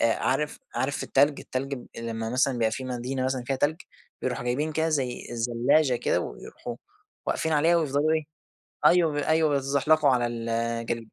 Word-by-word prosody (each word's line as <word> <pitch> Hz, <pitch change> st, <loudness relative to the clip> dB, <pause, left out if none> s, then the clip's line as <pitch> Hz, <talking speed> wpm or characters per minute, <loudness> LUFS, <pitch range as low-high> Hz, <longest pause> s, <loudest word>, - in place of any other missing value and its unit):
آآ 115 Hz, -, +3 dB
عارف 150 Hz, +3 st, -1 dB, 0.2 s
عارف 140 Hz, -, -1 dB
التلج 145 Hz, +1 st, +2 dB
التلج 135 Hz, +2 st, -3 dB
ب 125 Hz, -, -10 dB
لما 115 Hz, -1 st, -4 dB
مثلًا 130 Hz, +2 st, +2 dB
بيبقى 115 Hz, -2 st, +1 dB
في 130 Hz, +3 st, -4 dB
مدينة 130 Hz, +1 st, -3 dB
مثلًا 130 Hz, -1 st, -1 dB
فيها 135 Hz, -, 0 dB
تلج، 150 Hz, +4 st, +1 dB, 0.5 s
بيروحوا 125 Hz, -1 st, -2 dB
جايبين 145 Hz, +6 st, -1 dB
كده 160 Hz, +1 st, +1 dB
زي 130 Hz, -5 st, -1 dB
الزلاچة 120 Hz, +4 st, +2 dB
كده، -, -, +1 dB
ويروحوا -, -, -7 dB, 0.5 s
واقفين 160 Hz, -, 0 dB
عليها 160 Hz, +3 st, +4 dB
ويفضلوا 150 Hz, -1 st, +1 dB
إيه، 155 Hz, -1 st, +1 dB, 0.6 s
أيوه 170 Hz, -3 st, +5 dB
ب 145 Hz, -, -4 dB
أيوه 155 Hz, +1 st, +2 dB
بيتزحلقوا 140 Hz, +2 st, +3 dB
على 125 Hz, -2 st, +2 dB
الجليد، 115 Hz, 0 st, -2 dB
135 Hz, 165 wpm, -26 LUFS, 120-150 Hz, 0.6 s, أيوه